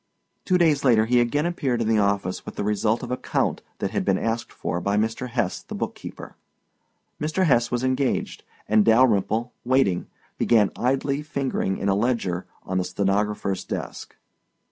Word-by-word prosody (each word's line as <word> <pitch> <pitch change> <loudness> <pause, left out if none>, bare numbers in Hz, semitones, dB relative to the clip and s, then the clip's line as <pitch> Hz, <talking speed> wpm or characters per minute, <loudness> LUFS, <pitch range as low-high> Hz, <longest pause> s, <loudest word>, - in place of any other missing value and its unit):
Two 185 - +3
days 160 -5 +3
later 115 -5 +4
he 125 +2 +3
again 145 +6 0
appeared 140 -8 -1
in 115 - 0
the 110 -1 +3
office 100 -2 0
with - - -9
the - - -2
result 105 +2 0
of - - -5
a 125 - 0
count - - -1 0.2
that - - -2
had - - -1
been 95 -1 +2
asked 115 +3 -2
for 85 +2 -3
by 100 +2 0
Mr. 115 +4 -1
Hesse, 120 -6 -1
the - - -8
bookkeeper. - - -6 0.9
Mr. 160 +5 +1
Hesse 120 -6 +3
was 120 0 -1
engaged 130 0 -1 0.2
and 110 0 +4
Dalyrimple, 115 0 +3
waiting, 120 -8 +2 0.3
began 110 -4 +4
idly 135 +3 0
fingering 135 - -2
in 100 - -2
a 100 - +3
ledger 100 -5 -1 0.2
on 95 0 -1
the - - 0
stenographer's 100 0 -1
desk. - - -6
115 Hz, 170 wpm, -24 LUFS, 100-130 Hz, 0.9 s, later